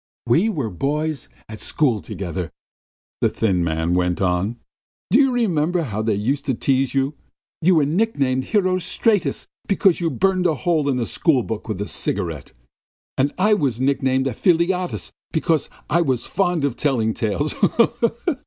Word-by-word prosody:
"We 165 - +3
were 140 - -2
boys 150 - -2 0.2
at 110 -1 -9
school 125 -9 +1
together," 90 +1 -5 0.7
the - - +3
thin 95 -6 0
man 80 +1 0
went 90 -1 +1
on. 95 +5 0 0.5
"Do 235 - +6
you 270 -2 +4
remember 175 -8 +1
how 110 -6 -3
they 110 -1 +1
used 125 +8 -1
to 130 - +1
tease 135 +2 0
you? 135 +2 +1 0.5
You 180 +3 +4
were 155 -3 +4
nicknamed 140 -7 0
Herostratus 185 +1 +1 0.2
because 195 -2 +3
you 170 -2 0
burned 185 +5 +1
a 160 - +1
hole 155 -2 0
in 130 - +1
a 120 - -1
schoolbook 125 -9 0
with 105 -4 -3
a - - -1
cigarette, 85 -8 -2 0.6
and 140 +2 +1
I 210 +3 +3
was 135 - 0
nicknamed 130 0 +1
Ephialtes 175 - 0 0.2
because 160 -2 0 0.2
I 170 +3 +2
was 130 -7 0
fond 175 -6 0
of 135 -4 -1
telling 120 -7 0
tales. 120 +6 -1
140 Hz, 155 wpm, -21 LUFS, 110-175 Hz, 0.7 s, Do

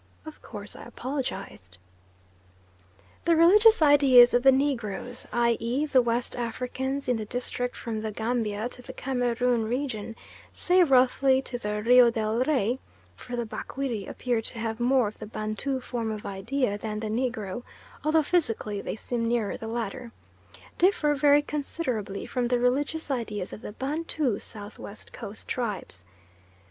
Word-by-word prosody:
Of 315 -1 -10
course 205 0 -9
I - - -10
apologised. 235 - -5 1.5
The 335 - +4
religious 415 +4 +6
ideas 275 -5 +7
of 245 - +4
the 270 +1 +7
Negroes, 245 -3 -1
i.e. 235 +3 +1
the 270 -4 +4
West 235 0 -1
Africans 255 +3 -3
in 250 -2 +2
the 215 - -4
district 245 +1 -3
from 220 -2 -4
the 220 - -3
Gambia 220 -1 -1
to 250 - -11
the 260 +1 -10
Cameroon 245 -2 0
region, 230 -3 -3 0.4
say 365 +1 +3
roughly 265 -1 +4
to 245 -2 -5
the 210 -1 -3
Rio 245 +1 +7
del 225 0 -1
Rey 260 -4 +1 0.4
(for 245 - -7
the 240 -1 -2
Bakwiri 235 -2 -4
appear 240 -3 -1
to 225 - -5
have 225 0 -3
more 250 -1 +3
of 210 - -9
the - - -7
Bantu 215 +6 -2
form 240 -3 -4
of 215 -1 -5
idea 205 +2 -1
than 215 0 -4
the 220 - -4
negro, 225 -2 -2 0.4
although 310 +1 +3
physically 225 - 0
they - - -4
seem 230 +1 -2
nearer 230 -3 0
the 225 - -7
latter), 235 +1 -4 0.7
differ 340 -5 +3
very 290 0 +4
considerably 260 -9 -3
from 250 -2 -1
the 245 0 +2
religious 280 +6 0
ideas 215 -7 -3
of - - -8
the - - -7
Bantu 285 -3 -1
South 205 0 -6
West 200 - -10
Coast 205 +2 -8
tribes. 210 - -4
245 Hz, 155 wpm, -27 LUFS, 220-270 Hz, 1.5 s, ideas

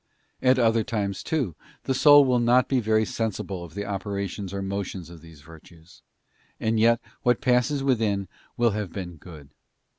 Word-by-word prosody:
At 130 0 +4
other 115 -2 +3
times, 105 -5 -3
too, 135 - -2 0.3
the 130 - -1
soul 145 +1 +7
will 125 -2 +2
not 120 +2 +3
be 135 - +1
very 110 -1 +2
sensible 100 -5 -4
of 85 0 -12
the 100 0 -4
operations 100 -1 -4
or 100 0 -4
motions 95 -3 -5
of 85 -2 -12
these 80 -3 -15
virtues, 80 +2 -17 0.6
and 110 0 0
yet 115 +1 +4 0.2
what 120 -1 +2
passes 125 +3 +1
within 110 -7 0 0.3
will 120 -1 +3
have 105 -3 -4
been 90 -3 -7
good. 75 -4 -13
105 Hz, 170 wpm, -25 LUFS, 95-120 Hz, 0.6 s, soul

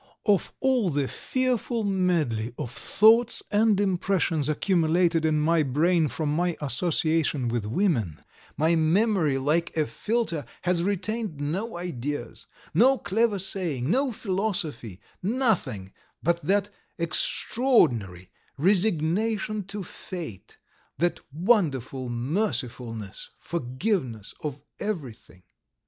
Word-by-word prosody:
Of 205 -4 +2
all 255 -7 +2
the 140 -3 0
fearful 250 - -1
medley 165 - 0
of 120 - -5
thoughts 225 - +4
and 210 -1 +3
impressions 180 -6 +1
accumulated 165 0 +2
in 155 -1 +2
my 165 +2 +3
brain 155 +4 +2
from 150 +1 -2
my 175 0 0
association 150 -1 0
with 115 -3 -2
women 115 - 0 0.4
my 160 +3 +3
memory, 165 -2 +2
like 160 +6 0
a 155 - +3
filter, 210 -6 -2 0.2
has 180 -1 +2
retained 205 -2 -2
no 175 +9 -3
ideas, 130 -8 -5 0.3
no 265 +3 +5
clever 210 +2 +1
saying, 170 -8 -1
no 265 +3 +2
philosophy, 185 - -2 0.2
nothing 195 - 0 0.3
but 170 +1 +1
that 200 +1 +1 0.3
extraordinary, 130 - +1 0.3
resignation 200 +4 +1
to 200 +1 -6
fate, 165 - -8 0.4
that 175 0 0
wonderful 145 - +1
mercifulness, 120 - -3
forgiveness 130 - -2
of 145 -2 -4 0.2
everything." 135 - -6
170 Hz, 105 wpm, -26 LUFS, 140-205 Hz, 0.4 s, no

